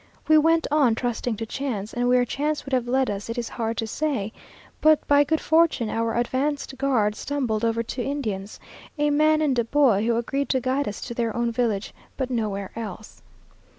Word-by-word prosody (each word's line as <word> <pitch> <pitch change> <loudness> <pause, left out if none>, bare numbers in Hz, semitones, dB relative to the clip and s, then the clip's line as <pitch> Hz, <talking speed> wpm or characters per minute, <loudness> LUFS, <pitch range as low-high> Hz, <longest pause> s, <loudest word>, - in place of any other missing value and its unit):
We 310 - +6
went 325 +2 +4
on, 280 -7 +4
trusting 240 -1 -2
to 225 - -4
chance, 225 -4 -4
and 245 0 0
where 250 0 +4
chance 295 +4 -2
would 275 - -7
have 250 -2 +1
led 260 +1 +2
us 200 +2 -4
it 230 - -4
is 235 -1 -3
hard 230 -1 -3
to 225 - -1
say; 225 -4 -2 0.5
but 310 -1 +4
by 285 0 +5
good 315 +2 0
fortune 315 -8 +2
our 230 0 -1
advanced 270 +3 -1
guard 240 -7 +2
stumbled 240 -4 -2
over 230 0 +1
two 245 - -5
Indians, 220 -8 -4 0.4
a 295 0 +2
man 310 +1 +3
and 270 -5 +1
a - - +3
boy, 230 -4 +3
who 235 - +2
agreed 275 +4 -1
to 260 - +2
guide 260 +3 -1
us 205 - -5
to 240 - -5
their 230 -2 -2
own 235 0 0
village, 225 -4 -1 0.2
but 260 -1 -2
nowhere 205 -5 -2
else. 215 -2 -8
245 Hz, 200 wpm, -24 LUFS, 225-285 Hz, 0.5 s, We